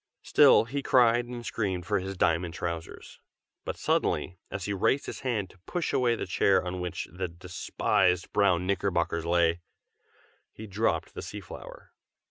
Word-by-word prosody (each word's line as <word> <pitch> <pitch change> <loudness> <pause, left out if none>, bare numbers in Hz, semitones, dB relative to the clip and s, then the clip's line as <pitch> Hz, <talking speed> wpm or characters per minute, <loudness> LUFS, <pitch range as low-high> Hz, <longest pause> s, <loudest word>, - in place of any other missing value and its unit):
Still - - +6
he 140 +4 -3
cried 120 -2 +4
and 120 -1 -7
screamed 95 -5 -2
for 100 +2 +1
his 95 +1 -6
diamond 85 -1 +1
trousers; 85 -1 -6 0.5
but - - -4
suddenly, 90 -1 0
as 95 -1 -5
he 100 - -1
raised 115 +8 +1
his - - -6
hand 110 -8 -2
to 90 - -22
push 175 -2 -2
away 120 -2 +2
the - - -4
chair 95 -2 +2
on 90 0 -4
which 90 -2 -4
the 90 +1 -3
despised 90 +1 0
brown 95 -4 +3
knickerbockers 85 -4 0
lay, 85 0 +2 0.9
he 110 - -10
dropped 95 -6 -1
the - - -6
sea - - -7
flower! - - -11
95 Hz, 160 wpm, -28 LUFS, 85-110 Hz, 0.9 s, Still